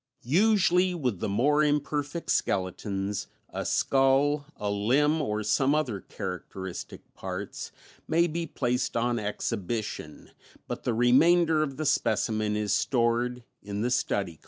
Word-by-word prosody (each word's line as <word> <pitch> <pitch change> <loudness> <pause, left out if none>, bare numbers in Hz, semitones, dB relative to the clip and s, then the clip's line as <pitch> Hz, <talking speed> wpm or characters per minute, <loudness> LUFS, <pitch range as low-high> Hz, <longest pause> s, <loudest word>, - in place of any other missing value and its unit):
Usually 180 - +3
with 125 - -2
the - - -2
more 145 +9 +3
imperfect 150 +2 -1
skeletons, 95 +1 -1 0.2
a - - -3
skull, 140 +2 +2
a 105 -1 -2
limb 140 +10 +2
or 105 -3 -2
some 135 +7 +2
other 130 -10 -1
characteristic 90 +1 -7
parts 95 +1 -6 0.4
may 170 +1 +3
be 170 0 -3
placed 125 0 -1
on 120 0 +1
exhibition 105 -5 -4 0.4
but - - -6
the 120 - +1
remainder 155 +7 +4
of 140 -3 -2
the 155 - -2
specimen 110 -6 +1
is 105 -1 0
stored 120 0 +1 0.2
in 100 0 -4
the 125 +2 0
study 105 -4 +1
collections. 85 -4 -11
125 Hz, 135 wpm, -28 LUFS, 105-150 Hz, 0.4 s, remainder